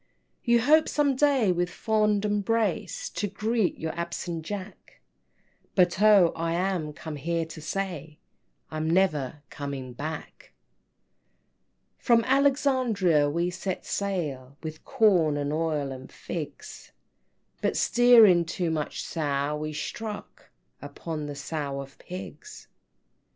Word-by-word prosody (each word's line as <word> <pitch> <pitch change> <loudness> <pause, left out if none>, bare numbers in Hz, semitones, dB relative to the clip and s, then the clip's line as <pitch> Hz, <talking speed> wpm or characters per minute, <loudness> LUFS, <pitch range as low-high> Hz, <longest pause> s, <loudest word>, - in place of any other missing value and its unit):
IV. - - -34
"You 235 0 +5
hope 310 +6 +4
some 285 -2 +2
day 265 -7 +3
with 175 0 0
fond 210 +1 +1
embrace 225 - 0
To 205 - -2
greet 215 +1 0
your 160 0 -3
absent 170 -1 -4
Jack, 200 +3 -8 0.8
But 180 0 +3
oh, 205 -5 +6
I 165 0 -1
am 175 -3 -1
come 150 0 -7
here 165 +3 -1
to 160 0 -10
say 160 -3 -4 0.5
I'm 155 0 -2
never 155 -6 +1
coming 140 -3 -5
back!" 155 +5 -7
V. - - -47
"From 235 -2 +4
Alexandria 255 - +3
we 170 +4 0
set 185 +1 -4
sail, 145 -10 -3
With 155 0 -7
corn, 175 -9 +3
and 145 0 -2
oil, 155 -3 -1
and 130 0 -9
figs, 175 - -7 0.7
But - - 0
steering 230 -8 +6
'too 170 0 -2
much 155 -2 -3
Sow,' 145 -2 -1
we 155 0 -4
struck 210 +7 -6 0.3
Upon 155 -3 -5
the 145 - -6
Sow 140 -1 -4
and 135 0 -9
Pigs!" 190 - -9
175 Hz, 125 wpm, -27 LUFS, 150-210 Hz, 0.8 s, oh